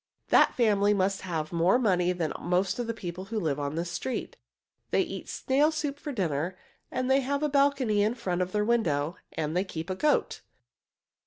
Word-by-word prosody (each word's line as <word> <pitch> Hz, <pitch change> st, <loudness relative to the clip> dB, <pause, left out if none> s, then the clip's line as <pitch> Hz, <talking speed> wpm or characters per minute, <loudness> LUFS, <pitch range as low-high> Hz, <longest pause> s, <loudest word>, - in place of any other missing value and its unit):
That -, -, +5 dB
family 210 Hz, -3 st, +3 dB
must 195 Hz, 0 st, 0 dB
have 165 Hz, -3 st, -3 dB
more 170 Hz, +6 st, +4 dB
money 180 Hz, -7 st, +2 dB
than 175 Hz, -3 st, -2 dB
most 180 Hz, +4 st, 0 dB
of 240 Hz, -, -2 dB
the 230 Hz, -, -1 dB
people 180 Hz, -2 st, -6 dB
who 220 Hz, +2 st, -3 dB
live 150 Hz, -6 st, -1 dB
on 145 Hz, +1 st, -3 dB
this 170 Hz, +1 st, -3 dB
street. 255 Hz, +8 st, -4 dB, 0.5 s
They -, -, +3 dB
eat -, -, -7 dB
snail 280 Hz, +4 st, +2 dB
soup 295 Hz, -2 st, -3 dB
for 295 Hz, -, -5 dB
dinner, 180 Hz, -, -2 dB, 0.3 s
they 265 Hz, +1 st, +2 dB
have 280 Hz, +2 st, -1 dB
a 300 Hz, -, +2 dB
balcony 275 Hz, -7 st, +2 dB
in 215 Hz, +3 st, +1 dB
front 185 Hz, -6 st, -2 dB
of 180 Hz, 0 st, -1 dB
their 210 Hz, +1 st, +1 dB
window, 170 Hz, -9 st, +1 dB, 0.2 s
and 155 Hz, 0 st, -2 dB
they 180 Hz, -, +2 dB
keep 170 Hz, -2 st, -6 dB
a -, -, -1 dB
goat." 300 Hz, +9 st, +1 dB
195 Hz, 190 wpm, -28 LUFS, 175-250 Hz, 0.5 s, That